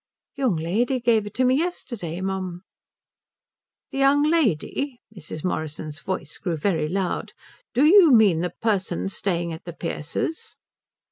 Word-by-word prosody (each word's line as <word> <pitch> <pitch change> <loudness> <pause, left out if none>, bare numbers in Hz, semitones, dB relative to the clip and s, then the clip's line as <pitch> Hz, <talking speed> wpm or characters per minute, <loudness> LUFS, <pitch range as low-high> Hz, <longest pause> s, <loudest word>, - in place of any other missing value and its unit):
"The 275 - -8
young 250 -9 +2
lady 220 +11 0
give 230 -3 +2
it 205 - -9
me 255 0 +4
yesterday, 235 - -3
mum." 185 -2 -3 1.3
"The 270 - -3
young 275 +1 +4
lady?" 280 - +1 0.2
Mrs. 155 -4 -8
Morrison's 155 -3 -3
voice 170 -5 -5
grew 170 -3 -2
very 160 -2 0
loud. 185 +2 -2 0.4
"Do 270 +5 +5
you 345 -1 +8
mean 210 -9 +5
the 175 +1 -1
person 195 -4 -1
staying 175 -4 -1
at 160 - -10
the 170 - -6
Pearces'?" 165 - -4
195 Hz, 140 wpm, -24 LUFS, 170-255 Hz, 1.3 s, you